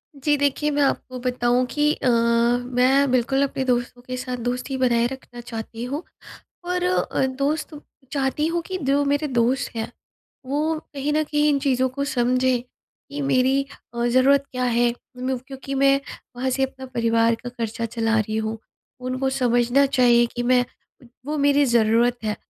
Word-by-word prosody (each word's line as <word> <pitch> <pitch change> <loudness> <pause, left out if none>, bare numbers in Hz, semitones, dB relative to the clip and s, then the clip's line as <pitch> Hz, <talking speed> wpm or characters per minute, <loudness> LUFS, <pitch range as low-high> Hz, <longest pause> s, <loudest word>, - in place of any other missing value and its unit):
जी 295 +2 +1
देखिए, 285 +1 +1
मैं 290 0 +1
आपको 255 -2 -1
बताऊँ 245 0 +1
कि 300 0 +2
अ, - - -3
मैं 245 +3 +2
बिल्कुल 260 +2 +2
अपने 270 -1 -2
दोस्तों 245 -1 -1
के 255 +1 -6
साथ 250 0 -4
दोस्ती 250 +2 -2
बनाए 240 -2 +2
रखना 245 -2 -9
चाहती 230 -1 -7
हूँ 285 +6 -4 0.6
और 360 0 -1
अ, 360 -6 +1
दोस्त 280 +4 -2 0.4
चाहती 280 +2 0
हूँ 340 +1 -1
कि 375 - -3
जो 280 +1 +2
मेरे 285 +2 +1
दोस्त 255 +1 0
हैं 225 +1 -4 0.5
वो 305 +4 -1
कहीं 285 +1 -2
न 310 +1 +2
कहीं 300 0 +1
इन 285 -1 +2
चीज़ों 260 -2 +1
को 280 +2 -3
समझें 255 -1 +1
कि 285 +3 -12
मेरी 265 0 +2 0.3
अ, 235 0 -1
ज़रूरत 265 +3 +4
क्या 255 0 -2
है? 240 0 +2 0.3
उन 255 +1 -2
क्योंकि 270 0 -6
मैं 275 0 +4 0.4
वहाँ 255 +2 -1
से 265 +1 0
अपना 265 0 -5
परिवार 230 -2 +2
का 245 - -4
खर्चा 230 -1 -4
चला 225 0 0
रही 215 0 -2
हूँ। 220 0 -2 0.4
उनको 255 +1 -2
समझना 250 0 +2
चाहिए 245 -3 +4
कि 245 - -2
मैं 245 0 +3 0.6
वो 300 +1 -2
मेरी 285 0 +4
ज़रूरत 235 0 +3
है। 210 -1 -1
255 Hz, 170 wpm, -23 LUFS, 240-275 Hz, 0.6 s, ज़रूरत